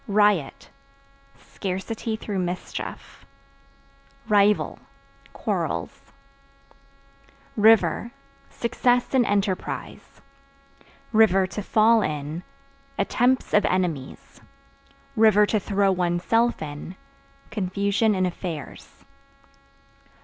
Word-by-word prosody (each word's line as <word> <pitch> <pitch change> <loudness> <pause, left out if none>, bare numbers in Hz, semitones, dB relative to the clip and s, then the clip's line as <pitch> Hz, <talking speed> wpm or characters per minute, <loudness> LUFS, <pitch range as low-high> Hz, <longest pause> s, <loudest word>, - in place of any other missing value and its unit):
Riot 205 -8 +1 0.7
Scarcity 205 +7 -4
through 210 -3 -4
mischief. 180 0 -6 1.0
Rival 210 -1 +2 0.5
Quarrels. - - -4 1.4
River 225 +1 +4 0.4
Success 245 +2 0
in 260 -2 +4
enterprise; 200 -2 -3 0.9
(to 200 -2 +3
fall 220 +2 +4
in) 150 0 -3 0.6
attempts 245 +5 +1
of 210 - +5
enemies; 170 -8 -3 0.8
(to 215 -1 +5
throw 200 -1 +1
one's 175 -1 -1
self 230 -3 +1
in) 150 +4 -8 0.6
confusion 200 +1 0
in 185 0 +1
affairs. 170 -5 -7
200 Hz, 70 wpm, -24 LUFS, 180-220 Hz, 1.4 s, of